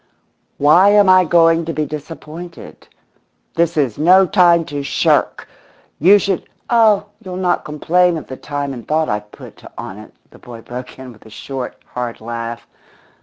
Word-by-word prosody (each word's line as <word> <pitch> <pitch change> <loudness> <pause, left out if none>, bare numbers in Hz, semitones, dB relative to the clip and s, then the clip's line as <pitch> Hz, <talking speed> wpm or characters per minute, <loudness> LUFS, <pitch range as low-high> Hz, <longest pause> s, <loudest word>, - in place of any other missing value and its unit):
"Why 165 +7 +5
am 205 -1 +5
I 185 0 +6
going 165 0 +3
to 165 - -4
be 155 +1 -2
disappointed? 160 +3 -10 0.7
This 170 0 0
is 130 -8 0
no 185 +5 +5
time 175 -3 +3
to 145 -1 -5
shirk! 140 - 0 0.5
You 190 +7 +6
should 195 -2 -2
" - - -43
"Oh, 220 -4 +4 0.2
you'll 185 -1 -7
not 180 -1 -1
complain 170 +3 +1
of 155 - -8
the 130 - -8
time 145 0 -5
and 120 -3 -10
thought 155 +1 0
I've 105 0 -4
put - - -14
on 95 - -8
it," 110 - -13 0.2
the - - -17
boy 120 -2 -11
broke 125 +2 -9
in 130 -1 -10
with 110 0 -19
a - - -14
short, 130 +3 -7 0.2
hard 120 -2 -5
laugh. 115 +1 -6
155 Hz, 170 wpm, -17 LUFS, 125-180 Hz, 0.7 s, I